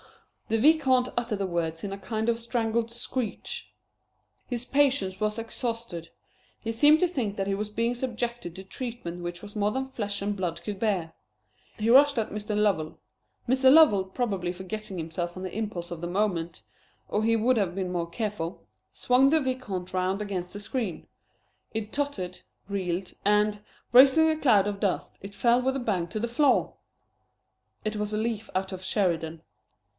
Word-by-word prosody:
The 225 - +1
Vicomte 260 -1 +4
uttered 235 -4 -1
the 195 - 0
words 165 -2 -2
in 195 -1 -3
a - - -5
kind 220 +3 -3
of 230 -1 +2
strangled 230 -1 -1
screech. 240 -1 -4 0.8
His 245 -1 -4
patience 265 -10 +2
was 215 +1 0
exhausted. 230 -6 -4 0.5
He 225 - -3
seemed 295 +7 +6
to 360 - +5
think 240 - -2
that 195 -1 -1
he 195 - +1
was 210 +1 -3
being 230 +3 0
subjected 240 -7 -3
to 190 - -8
treatment 195 -5 -6
which 175 0 -5
was 205 0 -11
more 210 0 +1
than 265 +3 -1
flesh 205 -6 -4
and 205 0 -1
blood 175 -3 -3
could 205 +1 -4
bear. 185 -7 0 0.6
He 220 +1 0
rushed 280 +2 +7
at 225 - 0
Mr. 210 0 -3
Lovell. 185 -7 +1 0.5
Mr. 260 +1 +5
Lovell, 270 -11 +7
probably 190 -4 -2
forgetting 190 +2 -6
himself 170 +2 -4
on 185 - -6
the 185 - -5
impulse 205 -6 -4
of 170 -2 -6
the 175 - -3
moment 175 -3 -1 0.4
or 210 - 0
he 230 +1 +3
would 245 +4 +3
have 195 -6 0
been 185 -2 -2
more 170 -1 -2
careful 200 -4 -4 0.3
swung 255 +2 +4
the 320 +2 +4
Vicomte 255 -10 -3
round 185 +1 0
against 185 -4 -3
the 205 - -6
screen. 210 -4 -3 0.7
It 220 -1 -4
tottered, 215 -12 -2 0.3
reeled, 185 -2 -2
and, 210 0 +2 0.3
raising 275 +5 +8
a 315 - +2
cloud 215 -10 +4
of 205 -1 -3
dust, 195 -3 -1
it 200 +1 -9
fell 240 +1 +3
with 265 +1 0
a - - -1
bang 195 -8 -1
to 195 +6 -4
the 235 - -1
floor! 260 +3 +2 1.1
It 215 0 -1
was 210 0 -2
a 210 - -1
leaf 220 -1 -2
out 190 +1 -1
of 185 0 -7
Sheridan. 165 -5 0
210 Hz, 180 wpm, -27 LUFS, 185-240 Hz, 1.1 s, raising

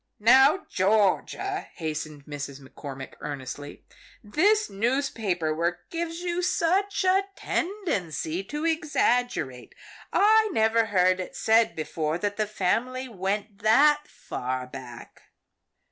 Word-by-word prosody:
"Now 265 - +5
Georgia," 215 - +1
hastened 155 -3 -5
Mrs. 145 -2 -6
McCormick 135 0 -9
earnestly, 145 0 -7 0.4
"this 410 - +2
newspaper 210 - -1
work 170 +2 -2
gives 335 0 -3
you 350 0 -1
such 375 +3 +1
a 380 +1 +3
tendency 195 - -2
to 295 +8 -4
exaggerate. 245 - 0 0.4
I 435 +1 +5
never 225 -1 +3
heard 185 -3 +3
it 185 - -6
said 225 +1 +3
before 155 0 -2
that 205 +3 -2
the 215 -1 0
family 240 +6 -1
went 205 -1 -3
that 295 +7 +4
far 130 0 -4
back." 125 -2 -11
215 Hz, 110 wpm, -26 LUFS, -, 0.4 s, Now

